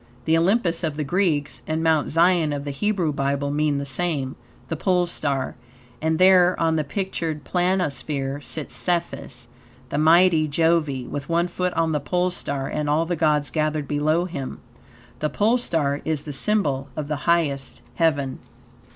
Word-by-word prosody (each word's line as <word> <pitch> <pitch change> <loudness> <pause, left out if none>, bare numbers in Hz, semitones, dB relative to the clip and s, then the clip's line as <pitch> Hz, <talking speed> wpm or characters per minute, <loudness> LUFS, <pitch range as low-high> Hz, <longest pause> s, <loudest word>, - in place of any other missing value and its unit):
The 160 - +3
Olympus 175 0 +2
of 155 -3 -2
the 150 - -1
Greeks 155 -3 0
and 160 +1 -1
Mount 160 -2 +2
Zion 165 -1 +3
of 140 -1 -3
the 145 - -3
Hebrew 175 +1 0
Bible 140 0 -1
mean 150 0 +1
the 140 - -3
same, 140 -2 -1 0.3
the 165 - -3
Pole 180 +2 +2
Star; 140 -5 -2 0.5
and 160 +1 +1
there, 185 0 +5
on 165 -1 +2
the 155 - +1
pictured 165 -2 -3
planisphere, 145 -6 -1
sits 155 +1 -5
Cephus, 170 -8 -2 0.4
the 145 - -1
mighty 165 0 +5
Jove, 165 +1 +2
with 135 +2 -5
one 170 +1 +2
foot 180 +1 -2
on 165 -1 +1
the 150 - +1
Pole 180 +5 0
Star 140 -6 -4
and 150 -1 -2
all 155 +3 +2
the 175 +1 -1
gods 150 -4 +1
gathered 155 -1 -1
below 155 +4 +1
him. 145 -7 -5 0.6
The 150 - 0
Pole 225 +8 +2
Star 145 -10 0
is 155 -2 -2
the 150 - -6
symbol 145 -7 +1
of 150 -2 -3
the 150 +2 -3
highest 145 -6 0
heaven. 140 -4 0
155 Hz, 170 wpm, -23 LUFS, 145-175 Hz, 0.6 s, there